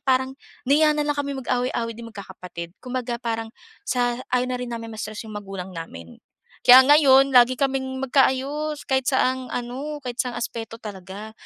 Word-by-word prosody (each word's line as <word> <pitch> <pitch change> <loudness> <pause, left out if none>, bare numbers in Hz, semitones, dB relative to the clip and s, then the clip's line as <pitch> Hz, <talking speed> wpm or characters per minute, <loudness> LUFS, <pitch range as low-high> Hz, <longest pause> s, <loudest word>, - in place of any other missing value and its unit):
parang 260 -1 +1 0.3
nahiya 300 +3 +4
na 295 - 0
lang 295 0 -1
kami 280 -1 -2
mag-away-away 245 -2 -1
din 230 +1 -9
magkakapatid. 180 -5 -9
Kumbaga, 250 -2 -4
parang 225 -2 -3 0.3
sa 245 -8 0 0.2
ayaw 250 0 +2
na 250 - -2
rin 250 - -4
namin 230 -1 -6
ma-stress 215 +1 -6
'yong 215 - -9
magulang 195 -2 -7
namin. 85 - -9 0.4
Kaya 255 +1 +10
ngayon, 275 -2 +6
lagi 245 +1 +7
kaming 265 -1 -1
magkaayos 280 +3 +1
kahit 265 -1 +1
saang 260 -1 +1
ano, 265 +5 -4
kahit 245 -1 -6
saang 250 -1 -5
aspeto 225 -1 -5
talaga. 200 0 -8
250 Hz, 160 wpm, -23 LUFS, 225-265 Hz, 0.4 s, Kaya